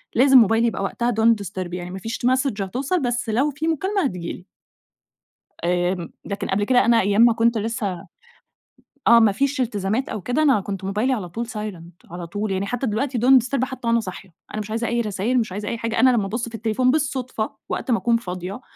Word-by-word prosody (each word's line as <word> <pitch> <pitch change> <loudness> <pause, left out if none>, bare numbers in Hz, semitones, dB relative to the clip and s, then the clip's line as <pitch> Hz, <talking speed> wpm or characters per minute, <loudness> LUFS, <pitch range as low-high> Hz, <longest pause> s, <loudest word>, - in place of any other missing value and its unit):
لازم 265 +2 +6
موبايلي 225 +1 +5
يبقى 195 - -2
وقتها 235 +4 -1
don't 225 +1 +4
disturb 185 -2 -5
يعني 180 0 -5
مافيش 195 +5 -5
message 255 -4 +1
هتوصل 265 - -1
بس 245 -2 -1
لو 270 +7 +1
في 305 +4 -4
مكالمة 380 +4 0
هتيجي 180 -7 -3
لي. 180 - -12 1.2
آمم، 175 0 0
لكن 200 0 -4
قبل 205 +2 0
كده 245 +3 +3
أنا 230 -1 +4
أيام 205 +3 +2
ما 235 -1 +7
كنت 230 0 +2
لسه 210 -5 -3 1.0
آه 235 0 +8
ما 220 -3 +5
فيش 275 +4 0
التزامات 220 +2 -1
أو 210 - -4
كده 250 - 0
أنا 265 -9 +4
كنت 195 -1 -5
موبايلي 210 +7 0
على 190 -7 -4
طول 230 +6 -4
silent 185 -8 -8
على 175 -1 -6
طول 205 +3 -3
يعني 190 +1 -1
حتى 245 +4 -2
دلوقتي 245 +4 -1
don't 255 0 +6
disturb 260 0 -1
حتى 255 -2 -5
وأنا 230 0 +3
صاحية، 185 -3 -8 0.2
أنا 215 - -3
مش 210 - -8
عايزة 230 +1 -1
أي 235 0 0
رسايل 215 +4 0
مش 215 -5 -2
عايزة 205 +2 -5
أي 235 - -3
حاجة 230 0 -2
أنا 260 +1 +6
لما 225 -5 +2
أبص 230 +4 -3
في 225 - -8
التليفون 230 +3 +1
بالصدفة 260 -6 -2
وقت 255 - -2
ما 230 - +4
أكون 235 -1 +2
فاضية 185 +1 -6
225 Hz, 210 wpm, -22 LUFS, 195-250 Hz, 1.2 s, آه